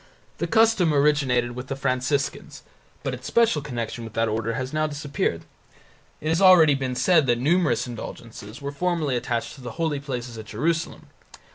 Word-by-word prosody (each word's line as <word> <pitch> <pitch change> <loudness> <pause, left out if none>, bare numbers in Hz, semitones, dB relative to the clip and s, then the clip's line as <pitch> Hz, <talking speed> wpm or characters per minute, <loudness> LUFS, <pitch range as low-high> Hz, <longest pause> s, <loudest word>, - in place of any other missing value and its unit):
The 170 - -1
custom 195 -5 +3
originated 140 -4 +2
with 125 +2 -7
the 135 - -3
Franciscans, 135 +1 -2 0.4
but 135 - -2
its 130 0 -7
special 230 -10 +3
connection 120 -4 -5
with 115 -1 -9
that 115 0 +1
order 110 +1 -1
has 130 +2 -4
now 155 0 +1
disappeared. 145 -1 -2 0.8
It 155 - -3
has 165 +3 +1
already 180 -6 +7
been 130 -2 -2
said 160 0 +3
that 120 -1 +3
numerous 150 -1 +2
indulgences 115 -1 -9
were 140 - -3
formerly 160 -3 -1
attached 120 -1 -2
to 135 - -13
the 120 -2 -7
holy 160 -4 0
places 125 -4 -6
at 110 - -8
Jerusalem. 160 +10 -2
135 Hz, 170 wpm, -24 LUFS, 120-155 Hz, 0.8 s, already